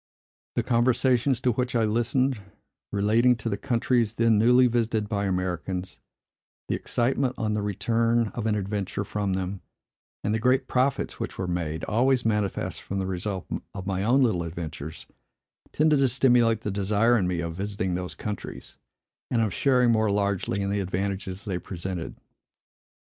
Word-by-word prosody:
The -, -, +1 dB
conversations, 125 Hz, +1 st, +2 dB
to 125 Hz, -, +2 dB
which 125 Hz, +2 st, -2 dB
I 115 Hz, -, +3 dB
listened, 120 Hz, +2 st, +1 dB, 0.5 s
relating 110 Hz, +5 st, +3 dB
to 115 Hz, 0 st, -4 dB
the 100 Hz, -, 0 dB
countries 115 Hz, +1 st, +1 dB
then 115 Hz, -2 st, +3 dB
newly 125 Hz, +3 st, +6 dB
visited 115 Hz, -3 st, +1 dB
by 100 Hz, -2 st, -1 dB
Americans, 90 Hz, -4 st, -3 dB, 0.7 s
the -, -, 0 dB
excitement 130 Hz, +1 st, 0 dB
on 110 Hz, -1 st, -1 dB
the 105 Hz, -, 0 dB
return 115 Hz, +3 st, +1 dB
of 110 Hz, 0 st, -4 dB
an 105 Hz, -, +2 dB
adventure 100 Hz, -1 st, -2 dB
from 100 Hz, -1 st, -2 dB
them, 95 Hz, 0 st, -3 dB, 0.6 s
and 105 Hz, -, 0 dB
the 110 Hz, -, +1 dB
great 130 Hz, +3 st, +2 dB
profits 130 Hz, +2 st, 0 dB
which -, -, -5 dB
were 95 Hz, -, -2 dB
made, 85 Hz, -3 st, -3 dB
always 125 Hz, +3 st, +2 dB
manifest 105 Hz, -3 st, -1 dB
from 100 Hz, -, -5 dB
the 95 Hz, -, -1 dB
result 95 Hz, +1 st, -3 dB, 0.3 s
of 95 Hz, -2 st, -6 dB
my 95 Hz, -1 st, -1 dB
own 130 Hz, +5 st, +4 dB
little 110 Hz, -8 st, +2 dB
adventures, 80 Hz, -2 st, -6 dB, 0.7 s
tended 150 Hz, -1 st, +3 dB
to 135 Hz, -, +4 dB
stimulate 120 Hz, -3 st, +3 dB
the 105 Hz, -, -3 dB
desire 105 Hz, +4 st, +2 dB
in 95 Hz, -6 st, +2 dB
me 90 Hz, -1 st, -1 dB
of 85 Hz, -1 st, -3 dB
visiting 95 Hz, 0 st, -3 dB
those 90 Hz, 0 st, -4 dB
countries, 105 Hz, -3 st, -7 dB, 0.5 s
and 115 Hz, -2 st, +2 dB
of 110 Hz, -, -1 dB
sharing 125 Hz, -3 st, +3 dB
more 110 Hz, -1 st, +2 dB
largely 100 Hz, -1 st, 0 dB
in 100 Hz, 0 st, -1 dB
the 100 Hz, -, 0 dB
advantages 95 Hz, +1 st, -3 dB
they 95 Hz, -4 st, -2 dB
presented. 90 Hz, -1 st, -5 dB
105 Hz, 165 wpm, -26 LUFS, 95-120 Hz, 0.7 s, newly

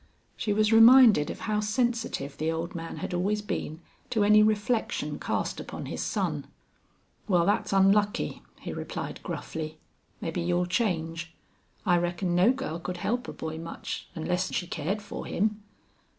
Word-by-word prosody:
She 210 Hz, -, -2 dB
was 215 Hz, +1 st, +3 dB
reminded 225 Hz, -, +8 dB
of -, -, -6 dB
how 215 Hz, -2 st, 0 dB
sensitive 225 Hz, -, -1 dB
the 160 Hz, +1 st, -1 dB
old 165 Hz, +2 st, -3 dB
man 165 Hz, -1 st, -6 dB
had -, -, -4 dB
always 205 Hz, +4 st, 0 dB
been 160 Hz, -5 st, -4 dB, 0.3 s
to 220 Hz, -4 st, +2 dB
any 210 Hz, +1 st, +6 dB
reflection 215 Hz, +2 st, 0 dB
cast -, -, -2 dB
upon -, -, -6 dB
his -, -, -4 dB
son. -, -, -2 dB, 0.8 s
"Wal, 175 Hz, -4 st, +3 dB
thet's 205 Hz, -, +1 dB
onlucky;" 200 Hz, +1 st, +2 dB, 0.2 s
he -, -, -5 dB
replied, -, -, -5 dB
gruffly. 155 Hz, -1 st, -5 dB, 0.4 s
"Mebbe 165 Hz, +1 st, -4 dB
you'll 175 Hz, +1 st, +1 dB
change. 165 Hz, -4 st, -1 dB, 0.5 s
I 175 Hz, -1 st, +4 dB
reckon 175 Hz, +1 st, -1 dB
no 180 Hz, +7 st, +5 dB
girl 260 Hz, -11 st, -4 dB
could 180 Hz, +1 st, -5 dB
help 240 Hz, +7 st, -1 dB
a -, -, -4 dB
boy 160 Hz, 0 st, -5 dB
much, 165 Hz, 0 st, -6 dB
onless 180 Hz, +3 st, -1 dB
she 175 Hz, -, -1 dB
cared 180 Hz, +5 st, -3 dB
for 205 Hz, -, -7 dB
him. 210 Hz, +2 st, 0 dB
185 Hz, 155 wpm, -28 LUFS, 170-215 Hz, 0.8 s, reminded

